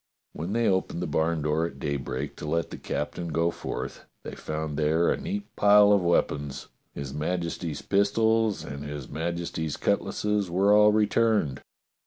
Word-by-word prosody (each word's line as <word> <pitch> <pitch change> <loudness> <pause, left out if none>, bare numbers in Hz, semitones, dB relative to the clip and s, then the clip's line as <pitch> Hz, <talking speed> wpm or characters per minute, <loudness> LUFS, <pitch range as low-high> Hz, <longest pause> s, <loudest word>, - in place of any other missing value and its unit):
When 85 +6 -4
they 115 0 +2
opened 95 -1 0
the - - -2
barn 80 -1 0
door 75 +2 +1
at 70 - -11
daybreak 70 0 -3
to 75 - -6
let 85 +1 -1
the - - -7
captain 85 +4 -3
go 85 +1 +1
forth, - - -6 0.2
they - - -7
found 75 -1 -4
there 80 +3 +2
a - - +2
neat 200 +1 -5
pile 105 0 +6
of 100 -2 +5
weapons: 75 -5 0 0.3
his 70 -1 -5
Majesty's 85 0 -3
pistols 110 +2 +2
and 70 +1 -7
his 75 -3 -6
Majesty's 80 -1 -3
cut - - +1
lasses 105 -3 -1
were 95 +4 +3
all 105 0 +7
returned. 105 - +2
85 Hz, 165 wpm, -27 LUFS, 75-105 Hz, 0.3 s, all